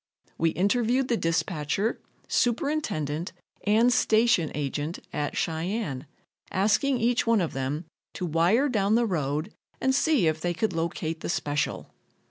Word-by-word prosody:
We 165 - +3
interviewed 240 +8 +1
the 240 - +3
dispatcher, 165 +3 -1 0.3
superintendent 215 - -1 0.3
and 230 +4 +4
station 220 -8 +3
agent 150 +3 -3 0.2
at 145 -1 -2
Cheyenne, 160 - -2 0.4
asking 215 +8 +2
each 235 0 +1
one 230 -2 +4
of 170 -4 -1
them 135 +5 -3 0.3
to 185 - -3
wire 175 - +3
down 210 -4 +2
the 235 0 +3
road 155 -5 -2 0.3
and 265 - +2
see 285 - +3
if 160 0 +1
they 175 0 -1
could 215 +3 0
locate 165 -1 -2
the - - -5
special. 145 -5 -2
180 Hz, 135 wpm, -27 LUFS, 155-230 Hz, 0.4 s, and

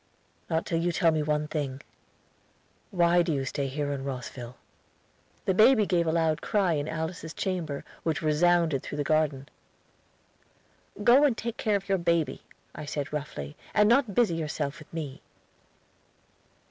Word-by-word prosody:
"Not 160 0 0
till 165 - 0
you 175 +1 +1
tell 170 0 +3
me 155 -1 0
one 150 0 0
thing. 140 -4 -3 1.1
Why 175 -2 +4
do 170 -1 0
you 135 -3 -1
stay 135 +1 -2
in 140 0 -3
Rosville?" 125 -2 -6 0.9
The 190 - +2
baby 215 +2 +6
gave 175 -3 +1
a - - +2
loud 160 -2 +1
cry 195 -5 +1
in 145 -1 -1
Alice's 160 +1 -4
chamber 170 -7 -3 0.2
which 160 -1 -1
resounded 160 -1 +3
through 145 - -6
the 145 - 0
garden. 145 -3 +1 1.6
"Go 250 +6 +7
and 265 -6 +3
take 235 0 -4
care 215 -2 +1
of 195 0 -3
your 195 -1 +1
baby," 170 -2 0 0.3
I - - -7
said 145 0 -4
roughly, 75 - -5 0.2
"and 210 0 +5
not 235 -3 +3
busy 235 -8 +3
yourself 150 -2 -3
with 150 - -15
me." 150 -5 -6
160 Hz, 155 wpm, -28 LUFS, 145-175 Hz, 1.6 s, Go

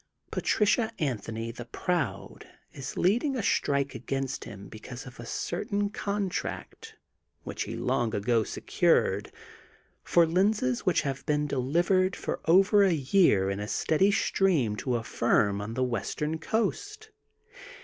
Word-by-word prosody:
Patricia 220 +2 +1
Anthony, 115 -4 -3
the 120 0 -9
Proud, 120 - -3 0.3
is 130 -1 -7
leading 240 - +2
a 235 - -2
strike 140 -6 +1
against 135 -1 -3
him 100 -1 -9
because 120 +4 -9
of 125 -3 -12
a 120 - -8
certain 200 - -2
con 200 -2 -2
tract, 180 - -6 0.5
which - - -4
he - - -5
long 120 -2 0
ago 110 +2 +2
secured, - - +1 0.7
for 170 -1 +4
lenses 180 - +1
which 185 - +3
have 140 -2 -4
been 150 0 +1
delivered 175 +8 +1
for - - -4
over 195 +5 +5
a 190 -3 +4
year 135 - +3
in 100 - -3
a 105 - -4
steady 160 - +2
stream 170 - +2
to 125 +4 -1
a 115 - -2
firm 100 -4 +1
on 110 +2 -5
the 130 - +1
western 140 +6 -2
coast. 415 - -2
145 Hz, 140 wpm, -28 LUFS, 120-195 Hz, 0.7 s, over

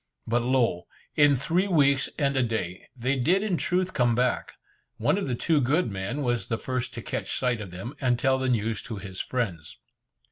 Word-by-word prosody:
But 120 +2 +1
lo! 120 -7 +1 0.3
in 145 -1 +5
three 170 +9 +1
weeks 140 -6 +3
and 140 -2 +1
a 130 - +3
day, 110 -7 -3
they 130 +2 0
did 175 +11 +2
in 205 -4 0
truth 185 +2 0
come 120 -3 +2
back. 125 +1 0 0.4
One - - +2
of 200 -6 -2
the 125 - 0
two 150 +4 +2
good 140 +1 +1
men 100 +9 -3
was 120 -6 0
the 115 - -1
first 130 +1 -3
to - - -6
catch - - -3
sight 125 -3 0
of 100 - -7
them, 95 +9 -7
and 125 -2 +2
tell 130 +1 +2
the 130 0 0
news 110 -2 0
to 115 -2 -6
his 95 -1 -5
friends. 95 -12 -3
125 Hz, 205 wpm, -27 LUFS, 115-140 Hz, 0.4 s, in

